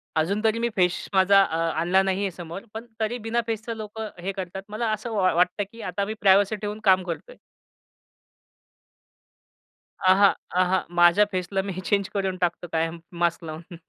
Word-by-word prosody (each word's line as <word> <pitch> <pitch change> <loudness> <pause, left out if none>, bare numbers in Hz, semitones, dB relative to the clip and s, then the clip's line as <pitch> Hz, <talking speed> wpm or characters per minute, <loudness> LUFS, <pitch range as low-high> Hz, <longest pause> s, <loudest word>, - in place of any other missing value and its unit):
अजून 190 +7 0
तरी 220 0 +2
मी 235 0 0
फेस 180 -2 +1
माझा 195 +1 +6
अ, 165 - -2 0.2
आणला 180 +3 +3
नाही 190 0 0
आहे 200 -2 -1
समोर. 170 +1 -8
पण 220 +2 -7
तरी 220 +2 -1
बिना 235 +1 +1
फेसचं 225 +1 -3
लोकं 215 0 -6
हे 190 +3 -2
करतात. 190 -1 -6
मला 220 +1 -2
असं 215 +2 -3
वा 185 -3 +3
वाटतं, 180 +4 +2
की 230 - -11
आता 200 +1 -2
मी 215 - -4
प्रायव्हसी 200 +2 +4
ठेऊन 210 0 -5
काम 190 -2 +5
करतोय. 185 - -7 2.7
अहां, 195 +2 +6 0.3
अहां, 185 0 +2
माझ्या 175 +4 +6
फेसला 185 +1 -1
मी 195 0 -5
चेंज 200 -1 +1
करून 195 -2 -1
टाकतो 175 0 -1
कायम 165 +1 -1 0.2
मास्क 170 0 +1
लावून. 165 +2 -8
195 Hz, 170 wpm, -25 LUFS, 180-215 Hz, 2.7 s, माझा